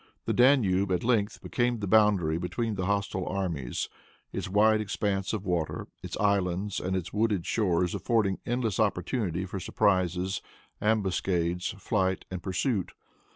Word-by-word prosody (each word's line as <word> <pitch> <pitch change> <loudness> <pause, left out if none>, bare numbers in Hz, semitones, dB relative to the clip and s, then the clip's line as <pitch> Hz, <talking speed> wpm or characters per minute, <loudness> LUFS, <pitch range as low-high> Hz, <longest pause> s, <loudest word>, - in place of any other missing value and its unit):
The - - 0
Danube 105 -8 +4
at 90 - +1
length 115 -3 +1
became 120 -1 0
the 105 - -3
boundary 95 -6 +3
between 110 +6 -2
the 95 -2 -2
hostile 100 -2 -1
armies, 85 -10 -2 0.5
its - - -3
wide 110 +2 +4
expanse 100 -1 -1
of 105 -2 -3
water, 85 -4 -2
its - - -6
islands 100 -1 +1
and 95 +1 -2
its 90 -2 -3
wooded 105 -4 +1
shores 90 -5 +1
affording 105 -5 +1
endless 120 -4 -1
opportunity 95 -2 0
for 95 +1 -5
surprises, 95 -1 +1 0.4
ambuscades, 95 -4 0
flight 95 -3 0
and 90 -1 -4
pursuit. 95 +1 -1
95 Hz, 140 wpm, -28 LUFS, 90-110 Hz, 0.5 s, Danube